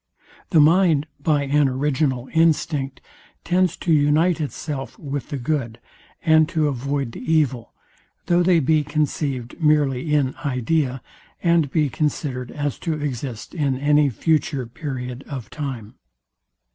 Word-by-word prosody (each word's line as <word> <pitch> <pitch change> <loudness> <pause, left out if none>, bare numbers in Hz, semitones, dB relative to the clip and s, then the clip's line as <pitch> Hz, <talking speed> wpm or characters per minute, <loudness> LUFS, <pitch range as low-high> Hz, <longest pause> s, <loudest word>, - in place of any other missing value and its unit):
The 165 - +4
mind 160 -1 +4
by 145 0 +1
an 140 0 +2
original 130 -1 0
instinct 150 -4 +1 0.4
tends 180 -1 +1
to 170 - 0
unite 155 +3 +3
itself 145 -1 -5
with 140 -4 -5
the 140 - -3
good, 120 -3 -2 0.4
and 160 -1 +4
to 155 -2 +1
avoid 140 -1 -2
the - - -9
evil, 130 -5 0 0.5
though 175 0 +3
they 175 -1 +4
be 155 +1 +2
conceived 145 -3 -2
merely 150 -2 +2
in 140 -3 +2
idea, 130 -1 0 0.4
and 170 -4 +3
be 150 +2 +1
considered 135 -3 -2
as 145 -2 -3
to 165 - -2
exist 130 -5 -5
in 140 -6 0
any 145 +1 +3
future 145 0 0
period 125 -1 -6
of 130 -5 -7
time. 130 -8 -5
145 Hz, 135 wpm, -22 LUFS, 130-155 Hz, 0.5 s, The